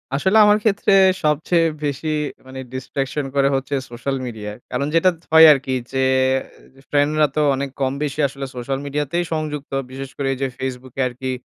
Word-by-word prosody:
আসলে 190 +9 +2
আমার 210 0 +5
ক্ষেত্রে 200 -2 +1 0.3
সবচেয়ে 160 +3 +2 0.2
বেশি 145 +2 -3 0.4
মানে 130 0 -8
distraction 135 +2 -3
করে 140 0 +3
হচ্ছে 135 +1 -3 0.2
সোশ্যাল 135 +3 -3
মিডিয়ায়। 105 -3 -7
কারণ 140 +3 -1
যেটা 185 +3 +5
য - - -29
হয় 160 0 +10
আরকি 135 -1 -3 0.2
যে 135 - -2 0.9
ফ্রেন্ডরা 150 +1 +3
তো 155 - +2
অনেক 140 +1 -3
কম 135 0 0
বেশি 145 +1 -4
আসলে 135 +1 -7
সোশ্যাল 135 +2 -3
মিডিয়াতেই 150 +4 -1
সংযুক্ত। 150 -3 -4 0.2
বিশেষ 135 0 -7
করে 140 -1 -2
এই - - -6
যে 135 - +1
Facebook 130 -1 -6
এ - - +3
আরকি। 130 +1 -5
140 Hz, 175 wpm, -20 LUFS, 130-150 Hz, 0.9 s, হয়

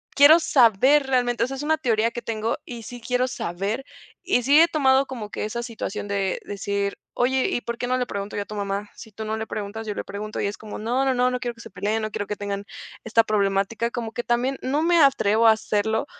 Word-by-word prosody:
quiero 295 +4 +8
saber 265 - +4
realmente, 245 -2 +1
o - - -5
sea, 270 - -5
es 280 - -5
una 315 +1 +2
teoría 230 -5 +1
que 240 - -6
tengo, 225 0 -2
y 235 -2 -8
sí 245 +2 -8
quiero 250 +1 0
saber, 205 +4 -3 0.4
y 300 -10 +1
si 285 +4 +6
he 335 - +6
tomado 275 -4 +3
como 230 -6 -7
que - - -3
esa 235 +3 -4
situación 220 -4 -5
de 195 -2 -1
decir: 200 0 -2 0.2
"Oye, 260 +1 +1
¿y 240 - -1
por 235 0 -5
qué 245 - -3
no 255 - +1
le 250 - 0
pregunto 200 +1 -5
yo 205 - -1
a - - -23
tu 215 - -8
mamá? 200 0 -3
Si 220 - -12
tú 220 +2 -6
no 220 +1 -2
le 220 - -4
preguntas, 215 +2 -5
yo 210 - -2
le - - -3
pregunto". 210 +2 -5
Y - - 0
es 205 - -5
como: 215 -1 -8
"No, 245 +5 0
no, 265 - +2
no, 250 0 +2
no 250 - -2
quiero 240 -1 -4
que 230 - -13
se 225 - -10
peleen, 215 +2 -2
no 215 - -3
quiero 205 - -4
que 210 - -3
tengan 200 0 -4 0.4
esta 225 +1 +4
problemática". 205 +2 0
Como 235 -3 -4
que, 240 - -4
también 250 +3 0
no 285 +4 0
me 340 0 +3
atrevo 230 -5 +4
a - - +9
hacerlo 220 +2 0
230 Hz, 250 wpm, -24 LUFS, 210-255 Hz, 0.4 s, a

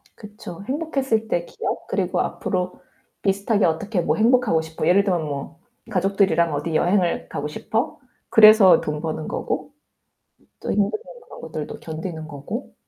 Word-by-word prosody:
그쵸. 210 -3 -10
행복했을 270 -6 -1
때 175 -4 -1
기억, - - -5
그리고 - - 0
앞으로 180 -1 -3 0.4
비슷하게 200 +1 +1
어떻게 180 +4 0
뭐 - - +1
'행복하고 230 -6 +3
싶어.' 160 0 -4
예를 200 +3 +5
들면 180 -4 +1
뭐 145 +3 -6 0.3
'가족들이랑 185 -4 +2
어디 155 +3 -2
여행을 175 +1 +1
가고 145 - -3
싶어.' 220 - -3 0.3
그래서 215 -3 +8
돈 150 0 -3
버는 160 -1 -4
거고 - - -3 0.9
또 - - -4
힘드는 200 -1 +2 0.4
그런 - - -12
것들도 - - -6
견디는 160 0 -6
거고. 165 - -7
185 Hz, 325 characters per minute, -23 LUFS, 160-215 Hz, 0.9 s, 그래서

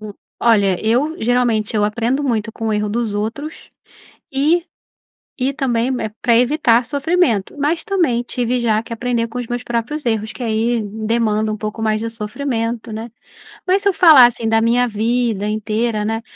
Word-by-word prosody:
Hum, 215 -1 -8 0.3
olha, 200 -6 +3
eu 270 +9 +1
geralmente 230 -2 +1
eu 210 - +2
aprendo 235 +6 0
muito 225 -5 -1
com 225 0 -4
o - - 0
erro 210 0 0
dos 220 0 -2
outros 230 +10 -5 0.6
e 310 +6 +2 0.8
e 270 +2 0
também, 250 -4 0
eh, 220 - -3
pra 235 -2 +3
evitar 245 -2 +3
sofrimento. 285 - 0
Mas 300 +4 0
também 340 - 0
tive 245 0 -1
já 220 -2 +1
que 230 - -10
aprender 235 0 -1
com 230 +2 -7
os 245 - -4
meus 245 +1 -3
próprios 240 +6 -3
erros, 220 -2 -1
que - - -8
aí 230 +1 0
demanda 220 0 -1
um 215 - -2
pouco 215 +1 -5
mais 215 -1 +1
de 225 +1 -4
sofrimento, 230 0 -3
né, 225 +2 -6 0.6
mas 385 +2 +2
se 400 - +1
eu - - +1
falar 315 -9 +8
assim 235 -2 0
da 225 0 +3
minha 240 +2 +2
vida 225 -1 -1
inteira, 215 +1 -1
né 225 +1 -2
230 Hz, 180 wpm, -18 LUFS, 220-250 Hz, 0.8 s, falar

